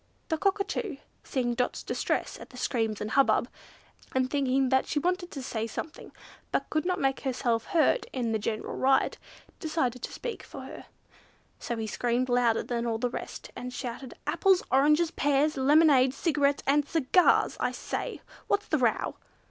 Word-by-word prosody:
The 320 - +1
Cockatoo, 395 - -1 0.3
seeing 245 -3 -1
Dot's 250 +1 -1
distress - - -2
at - - -11
the 250 - -13
screams 225 -4 -1
and 210 - -3
hubbub, 275 -1 +3 0.7
and 260 0 +1
thinking 270 -2 +2
that 265 0 +2
she - - -2
wanted 355 +3 0
to 275 -6 -7
say 225 -3 -3
something, 310 +8 -7 0.4
but - - -1
could 310 +2 0
not 365 0 0
make 270 -1 +1
herself 240 -3 -1
heard 340 +9 +2
in 240 -3 -1
the 220 - 0
general 215 +1 -3
riot, 270 +1 +2 0.4
decided 285 -7 -1
to - - -5
speak 475 - -5
for - - -10
her; - - -9 0.7
so 235 - -3
he 220 - -2
screamed 240 +3 0
louder 245 -2 +3
than 235 -1 -2
all 225 -1 0
the 245 +1 -1
rest, - - -7
and 250 0 -6
shouted, 250 0 -6
"Apples, 355 +5 +3
oranges, 300 +5 +4
pears, 290 +1 +2
lemonade, 275 -1 +5
cigarettes, 285 -3 +1
and 290 +1 +3
cigars! 330 +3 +3
I - - 0
say! - - -4 0.3
what's 410 0 +1
the 310 - +2
row?" 240 -3 +1
270 Hz, 170 wpm, -28 LUFS, 245-310 Hz, 0.7 s, lemonade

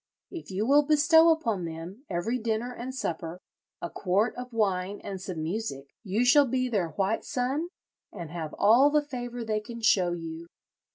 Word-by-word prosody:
If 345 -3 -8
you 195 +3 -1
will 285 +4 +6
bestow 315 +3 +5
upon 230 - +1
them, 165 - -8
every 195 +8 -1
dinner 230 +2 -2
and 255 +2 -6
supper, 170 -6 -4 0.4
a 170 - -2
quart 200 +5 0
of 250 0 -7
wine 200 -3 0
and 195 -2 -6
some 180 -4 -5
music, 160 -7 -4
you 215 +4 0
shall 280 +3 +6
be 255 +1 0
their 195 -8 0
white 200 +3 0
son, 275 +4 -1 0.4
and 165 -3 -8
have 160 -3 -5
all 235 +8 +6
the 300 0 +2
favour 245 -4 -5
they 215 -1 0
can 235 +2 -9
show 185 -5 +3
you.'" 165 0 -7
220 Hz, 175 wpm, -28 LUFS, 180-255 Hz, 0.4 s, will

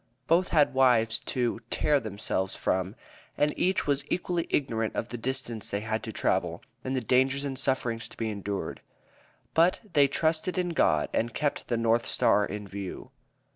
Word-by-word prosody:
Both 175 +5 +3
had 150 -3 +3
wives 120 -4 +4
to 125 -2 -1
"tear 150 -1 +2
themselves 100 -4 -2
from," 95 +3 -1 0.4
and 150 0 +2
each 185 +1 +1
was 140 -1 +1
equally 175 -1 -1
ignorant 115 -6 0
of 115 - -2
the - - -5
distance 120 -3 -3
they 100 - -2
had 110 +1 -2
to - - -5
travel, - - -1 0.2
and 130 +1 -2
the 130 - 0
dangers 130 +3 +2
and 135 -1 -3
sufferings 125 -4 0
to - - -14
be 110 -1 -2
endured. 100 -1 -4 0.7
But 170 +3 +4
they 145 -2 +6
"trusted 160 +5 0
in 180 -1 0
God" 80 - +2
and 115 0 -1
kept 145 -2 -1
the 120 - 0
North 115 +1 +2
Star 105 - +3
in 105 -1 -6
view. 100 -1 -7
125 Hz, 175 wpm, -28 LUFS, 110-145 Hz, 0.7 s, they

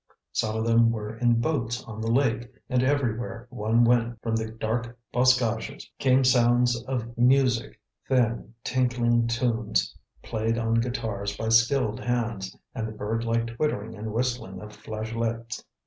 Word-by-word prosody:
Some 110 0 -1
of 110 - -1
them 115 0 +5
were 110 -1 -4
in 120 0 +2
boats 125 -4 -1
on 110 -1 -8
the 115 +1 0
lake, 120 -2 +1 0.2
and 125 -1 +3
everywhere 120 -4 -1
one 115 0 +2
went, 120 -1 +2
from 115 -1 0
the 110 0 -2
dark 115 +2 -3 0.2
boscages, 125 0 +2
came 130 0 +4
sounds 120 -1 +4
of 120 -2 -3
music, 125 0 +3 0.3
thin, 120 -3 +1
tinkling 120 -2 +2
tunes 115 - 0 0.3
played 115 0 -1
on 115 0 +2
guitars 110 -4 -3
by 110 - -2
skilled 115 0 +3
hands, 115 -6 -2 0.2
and 115 -4 -3
the - - -6
bird 110 +2 -2
like 115 0 +1
twittering 115 -2 -2
and 110 0 -6
whistling 120 +1 -2
of 105 0 -10
flageolets. 115 +2 -4
115 Hz, 145 wpm, -26 LUFS, 110-125 Hz, 0.3 s, them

